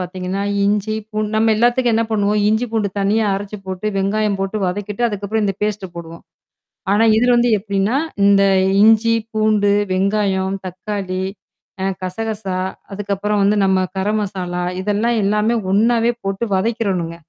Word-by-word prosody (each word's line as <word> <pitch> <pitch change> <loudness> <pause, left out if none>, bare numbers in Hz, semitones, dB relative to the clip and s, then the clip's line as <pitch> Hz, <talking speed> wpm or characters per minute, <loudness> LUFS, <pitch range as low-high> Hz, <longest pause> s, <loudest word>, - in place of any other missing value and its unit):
பார்த்தீங்கன்னா, 185 +1 -4 0.2
இஞ்சி, 210 +1 0 0.2
பூண்டு 215 -1 -2
நம்ம 220 0 +3
எல்லாத்துக்கும் 240 +1 +2
என்ன 230 - +2
பண்ணுவோம், 210 -1 +1
இஞ்சி, 220 +3 +1
பூண்டு 215 -3 0
தனியா 210 +3 +2
அரைச்சுப் 200 0 -6
போட்டு, 190 +2 -4
வெங்காயம் 200 +1 0
போட்டு 195 +2 -2
வதக்கிட்டு, 205 +4 -4
அதுக்கப்புறம், 205 +1 -2
இந்த 195 -1 0
பேஸ்ட் 210 -2 -1
போடுவோம். 165 0 -9 0.7
ஆனா, 215 - +3
இதுல 245 +1 +3
வந்து 240 0 +3
எப்பிடின்னா 200 +4 -1 0.3
இந்த 200 0 +5 0.4
இஞ்சி, 225 +1 +5 0.2
பூண்டு, 215 -2 +2 0.2
வெங்காயம், 195 0 0
தக்காளி, 185 0 -4 0.6
அ - - 0 0.2
கசகசா, 205 0 -3 0.4
அதுக்கப்புறம் 205 +1 -2
வந்து 205 +1 +3
நம்ம 190 -1 +3 0.2
கரம்மசாலா 190 -3 -2 0.2
இதெல்லாம் 210 +4 0
எல்லாமே 210 +3 +1 0.2
ஒண்ணாவே 230 +3 +3
போட்டு 195 +3 -2
வதக்கிறனுங்க. 190 -5 -1
205 Hz, 135 wpm, -19 LUFS, 195-220 Hz, 0.7 s, இந்த